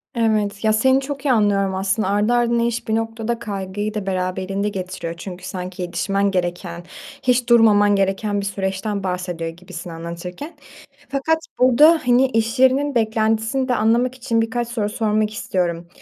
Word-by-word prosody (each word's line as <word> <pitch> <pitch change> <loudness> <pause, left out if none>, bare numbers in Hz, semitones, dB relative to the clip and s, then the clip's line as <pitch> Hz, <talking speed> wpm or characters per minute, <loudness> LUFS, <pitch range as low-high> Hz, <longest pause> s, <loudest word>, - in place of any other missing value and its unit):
Evet, 215 -3 0
ya, 215 0 +3
seni 260 +5 +3
çok 280 +1 -6
iyi 275 - +3
anlıyorum 200 -4 +2
aslında. 195 +1 0
Ardı 205 +4 +2
ardına 235 -1 +2
iş 235 0 -2
bir 220 - +1
noktada 225 +1 -2
kaygıyı 205 -1 -4
da 210 -3 -4
beraberinde 190 +2 -2
getiriyor 185 -3 -5
çünkü 180 0 -8
sanki 185 -1 -6
yetişmen 195 +3 0
gereken, 175 -1 -3 0.4
hiç 250 -2 +2
durmaman 210 -3 +5
gereken 200 +1 0
bir - - -5
süreçten 195 +1 -3
bahsediyor 180 -3 -3
gibisin 175 +1 -9
anlatırken. 170 - -7 0.5
Fakat 280 +4 +1 0.2
burada, 295 +6 +6
hani, 245 +1 +4
iş 225 0 -1
yerinin 265 +2 +3
beklentisini 225 +3 +1
de 250 - +1
anlamak 240 +4 +2
için 245 -3 0
birkaç 230 +1 -2
soru 225 -3 -2
sormak 215 -1 0
istiyorum. 175 -5 -2
210 Hz, 155 wpm, -21 LUFS, 190-235 Hz, 0.5 s, burada